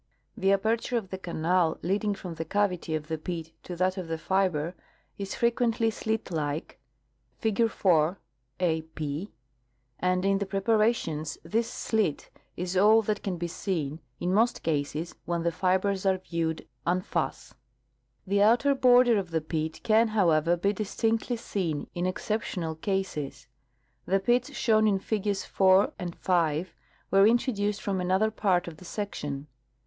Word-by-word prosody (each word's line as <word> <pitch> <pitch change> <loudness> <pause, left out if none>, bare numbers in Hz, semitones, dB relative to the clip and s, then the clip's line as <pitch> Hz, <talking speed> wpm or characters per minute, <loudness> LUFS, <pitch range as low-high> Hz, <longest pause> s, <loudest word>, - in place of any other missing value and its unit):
The 195 0 +2
aperture 225 +5 +1
of 195 -5 -5
the 190 - -4
canal 170 -1 +1
leading 200 +4 0
from 180 -3 -7
the 165 0 -4
cavity 180 -2 0
of 155 -1 -4
the 160 -1 -3
pit 165 0 -5
to 180 - -7
that 185 +2 +1
of 180 - -5
the 165 0 -2
fiber 175 -2 0 0.5
is 195 0 -4
frequently 235 -1 +1
slit 220 -2 -3
like 150 -3 -3 0.6
(figure 225 +1 +1
4, 175 -3 +2 0.4
a 165 -3 +1
p), 160 +3 -5 0.7
and 185 +1 +1
in 195 0 +3
the 200 - -2
preparations 195 -6 +1
this 225 +8 0
slit 215 -10 -1 0.3
is 180 +1 -3
all 215 +4 +6
that 210 0 -1
can 185 -3 -3
be 170 +1 -3
seen, 165 -4 -3 0.2
in 180 +1 0
most 230 +4 +2
cases, 155 +1 -2
when 170 -1 -1
the 170 - +1
fibers 190 +2 +1
are 190 -1 +3
viewed 165 -3 -3 0.2
en 180 +1 +2
face. - - -3 0.7
The 200 +1 +2
outer 240 +7 +5
border 245 -4 +5
of 185 -3 -5
the 165 -1 0
pit 155 0 -3
can, 225 +1 +4
however, 170 -5 +2
l)e 200 +1 +3
distinctly 225 +3 -1
seen 175 -9 -2
in 175 +1 -1
exceptional 185 -4 -2
cases. 175 -4 -3 0.6
The 195 +1 +3
pits 240 +5 +1
shown 215 -2 +3
in 200 -2 +3
figures 205 0 -2
4 190 +1 +4
and 175 -1 -5
5 170 -1 0 0.4
were 195 +1 +6
introduced 210 -3 +1
from 195 -3 -1
another 190 +4 +2
part 190 -5 +1
of 165 -2 -8
the 180 - -13
section. 145 -8 -4
190 Hz, 155 wpm, -28 LUFS, 165-210 Hz, 0.7 s, all